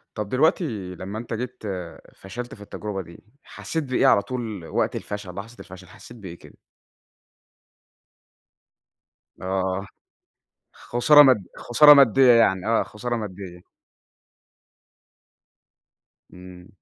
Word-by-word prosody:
طَب 105 -2 -5
دلوقتي 125 - -1
لمّا 95 +4 -7
أنت 115 0 -7
جيت 125 +2 -6 0.5
فشلت 120 +6 -9
في 105 - -17
التجربة 105 -1 -6
دي، 85 -1 -15 0.2
حسيت 160 -1 -5
بإيه 130 0 +1
على 100 - +4
طول 110 -6 -6
وقت - - -2
الفشل، 100 -3 -7
لحظة 110 +4 -9
الفشل 95 -1 -13
حسيت 120 +7 -15
بإيه 90 -5 -10
كده؟ - - -17 2.8
آه. 95 +1 -2 0.9
خسارة 145 +5 +4
مد 125 -9 +3
خسارة 150 +5 +6
مادية 135 -2 +5
يعني، 95 -5 +2
آه 115 0 +2
خسارة 120 +3 -5
مادية. 95 -5 -8 2.7
إمم. 90 0 -13
105 Hz, 105 wpm, -23 LUFS, 95-125 Hz, 2.8 s, خسارة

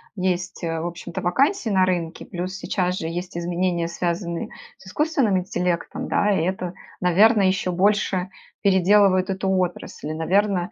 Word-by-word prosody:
есть, 185 -1 -2
в 165 0 -2
общем-то, 175 0 -6
вакансий 270 - +1
на 190 -2 +4
рынке, 175 -3 -2
плюс 185 +1 -5
сейчас 180 -2 -1
же 160 - -3
есть 175 +1 -5
изменения, 175 0 -1
связанные 170 0 -3 0.3
с 190 - -17
искусственным 265 - +1
интеллектом, 180 -1 -2
да, 205 0 +2
и 175 -5 +1
это, 180 -1 -2 0.3
наверно, 205 +5 +5
еще 185 -1 +1
больше 190 0 +1 0.3
переделывает 195 -1 +4
эту 190 0 -1
отрасль. 180 -4 -2
Наверно, 185 +2 +1
185 Hz, 140 wpm, -23 LUFS, 175-195 Hz, 0.3 s, наверно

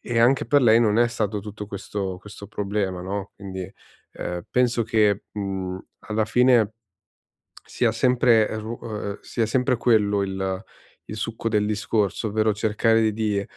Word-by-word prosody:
e 120 -1 -2
anche 130 +3 +4
per 145 -2 +4
lei 115 -1 +6
non 110 -1 +3
è 120 - +4
stato 105 -3 -2
tutto 105 +1 -8
questo 100 -2 -4
questo 100 0 -11
problema, 100 -2 -2
no, 100 +2 -5
quindi, 95 -2 -7 0.4
ehm, 90 0 -5
penso 125 -1 +2
che, 105 -3 +2
mhmm, 95 -2 -3 0.2
alla 110 0 -1
fine 120 -3 +4 0.9
sia 120 - 0
sempre, 120 -2 +3
ehm, 110 - -3
su 110 +2 -6
uhm, 105 -2 -5
sia 115 -2 -1
sempre 125 +2 +1
quello 105 -4 +3
il 95 -1 -3 0.4
il 105 - -6
succo 115 +1 -3
del 105 -1 +1
discorso, 105 0 0
ovvero 110 +1 +2
cercare 110 +1 +2
di, 105 -2 0
105 Hz, 155 wpm, -24 LUFS, 100-115 Hz, 0.9 s, lei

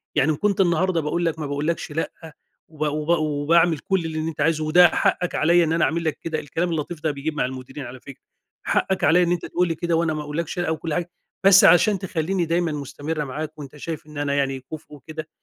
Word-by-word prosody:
يعني 150 +1 +3
إن - - 0
كنت 200 +1 +1
النهارده 175 -1 +2
باقول 170 +3 -1
لَك 160 -1 -1
ما 155 - -3
باقولكش 150 +3 -2
لأ، 160 - -2 0.6
وب 155 -2 -16
وب 150 +1 -3
وباعمل 155 +2 +2
كل 190 +2 -1
اللي 160 -1 -3
أنتَ 155 -1 -3
عايزه 155 +1 +2
وده 175 +3 +7
حقَك 180 - 0
علىَّ 170 +3 +4
إن 160 -1 0
أنا 170 - +2
أعمل 165 +1 -1
لك 155 -3 -1
كده. 160 -2 -3
الكلام 165 +5 -2
اللطيف 160 0 -4
ده 155 - +1
بيجيب 150 +2 -4
مع - - +1
المديرين 130 +2 -7
على 125 +2 -9
فكرة، 135 +1 -13 0.4
حقَك 190 -1 0
عليَّ 180 +2 +5
إن 175 - 0
أنتَ 175 -1 -1
تقول 180 +1 0
لي 165 - -2
كده 170 +1 -1
وأنا 165 -1 +1
ما 155 - -3
أقولكش 155 +4 -4
لأ 175 - -1
وكل 160 0 -3
حاجة، 175 +1 -2 0.3
بس 195 0 +8
عشان 185 +4 +5
تخليني 180 0 -1
دايمًا 170 0 0
مستمرة 150 +2 -4
معاك 155 +3 -6
وأنتَ 145 0 -9
شايف 155 +1 -6
إن 150 -1 -11
أنا 145 -1 -1
يعني 135 -1 0
كفء 155 -1 -9
وكده، 155 +3 -8
160 Hz, 225 wpm, -23 LUFS, 150-170 Hz, 0.6 s, بس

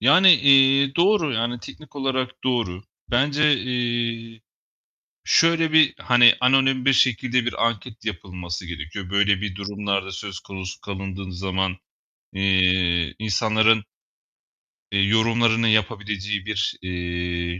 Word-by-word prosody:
Yani, 165 - +6
eee, 135 -1 +4
doğru, 170 -5 +2
yani 120 +1 -2
teknik 150 -1 -13
olarak 130 -1 -3
doğru. 110 -8 -2 0.3
Bence, 145 +4 +2
eee, 120 -2 -3 0.8
şöyle, 165 -1 +2
bir, 155 -3 +4
hani, 120 -1 +5
anonim 130 0 +2
bir 135 - +4
şekilde 125 -1 +1
bir 115 -1 0
anket 115 0 -7
yapılması 90 -3 -6
gerekiyor. 85 +3 -8
Böyle 100 0 +1
bir 100 -3 -5
durumlarda 100 -1 -3
söz 95 -1 -7
konusu 95 0 -9
kalındığın 95 -1 -7
zaman, 95 +1 -3 0.6
eee, 90 -3 +1
insanların 110 +1 +2 1.1
eee, 100 - 0
yorumlarını 115 +1 +2
yapabileceği 105 -2 -1
bir, 105 -1 -2
eee, 90 -1 -4
110 Hz, 115 wpm, -22 LUFS, 95-125 Hz, 1.1 s, Yani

